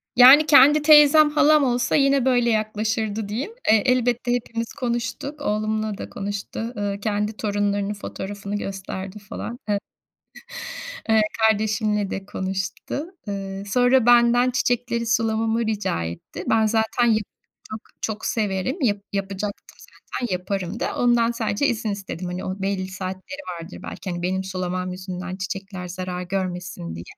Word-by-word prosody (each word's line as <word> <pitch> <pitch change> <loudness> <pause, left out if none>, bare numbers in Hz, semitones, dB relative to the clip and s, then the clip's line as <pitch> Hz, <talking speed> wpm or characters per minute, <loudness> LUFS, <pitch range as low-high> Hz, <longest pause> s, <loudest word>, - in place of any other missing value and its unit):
Yani 265 +5 +9
kendi 290 +1 +7
teyzem, 300 0 +7
halam 300 0 +4
olsa 245 -2 +1
yine 275 -2 +3
böyle 245 -2 +3
yaklaşırdı 215 -1 -1
diyeyim, 245 - -3 0.2
eee, 220 -2 +5
elbette 245 -1 +2
hepimiz 230 -1 -3
konuştuk, 245 +4 -3
oğlumla 215 -3 -1
da - - -7
konuştu, 200 0 -5 0.2
ııı, 200 -1 -2
kendi 210 +1 -1
torunlarının 205 -1 0
fotoğrafını 200 0 -6
gösterdi 195 0 -5
falan. 230 +4 -7
E 205 - +2 1.3
Eee, 220 -1 +5 0.2
kardeşimle 215 -2 +2
de 195 - -5
konuştu. 195 +9 -4 0.2
Eee, 195 -1 -4
sonra 245 +2 +4
benden 240 +1 +5
çiçekleri 245 -1 0
sulamamı 225 0 +1
rica 210 - -1
etti. 85 - -7
Ben 220 -1 +4
zaten 220 +2 +1
ya 220 -2 +4 0.5
çok 215 - -5 0.2
çok 215 -1 -3
severim, 215 - -1
yap 205 -5 +2 0.2
yapacaktım 200 +1 -4
zaten, 240 -7 -6
yaparım 185 +2 -3
da, - - -2
ondan 240 -1 +3
sadece 230 +2 0
izin 225 -2 -1
istedim. 195 -3 -5
Hani 180 +1 -4
o 190 +1 -4
belli 195 -1 -1
saatleri 190 +8 -6 0.2
vardır 165 +3 -9
belki, 190 - -7
hani 175 0 -4
benim 190 +2 -1
sulamam 185 -1 -3
yüzünden 185 0 -6
çiçekler 190 -1 -5
zarar 180 0 -5
görmesin 180 - -4
diye. 85 - -7
210 Hz, 140 wpm, -23 LUFS, 195-240 Hz, 1.3 s, Yani